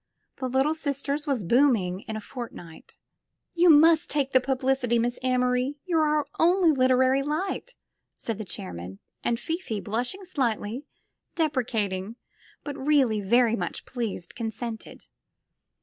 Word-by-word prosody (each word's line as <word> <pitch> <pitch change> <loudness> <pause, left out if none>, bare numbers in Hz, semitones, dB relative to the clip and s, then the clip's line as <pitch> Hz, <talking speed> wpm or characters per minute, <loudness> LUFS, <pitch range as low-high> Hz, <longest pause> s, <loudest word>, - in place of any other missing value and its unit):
''The 260 -2 -3
Little 270 +4 +2
Sisters" 285 -1 -3
was 265 -7 0
booming 210 -4 +3
in 220 - -4
a 215 - -4
fortnight. 210 -9 -10 0.6
"You 350 0 +4
must 320 +2 +6
take 280 -2 0
the 260 - +7
Publicity, 260 -2 +1
Miss 240 +1 -1
Amory; 250 +1 +1
you're 335 -4 +2
our 300 -1 +1
only 350 0 +5
literary 260 0 +3
light," 365 - -3 0.4
said 225 -2 -4
the - - -3
chairman, 90 - -7 0.3
and 235 -1 0
Fifi, 325 - -3
blushing 245 - -2
slightly, 250 - -2 0.5
deprecating, 225 - -1 0.5
but 290 -1 -5
really 265 -7 +2
very 230 +3 +3
much - - -4
pleased, 230 -8 -4
consented. 225 0 -6
255 Hz, 130 wpm, -26 LUFS, 225-295 Hz, 0.6 s, the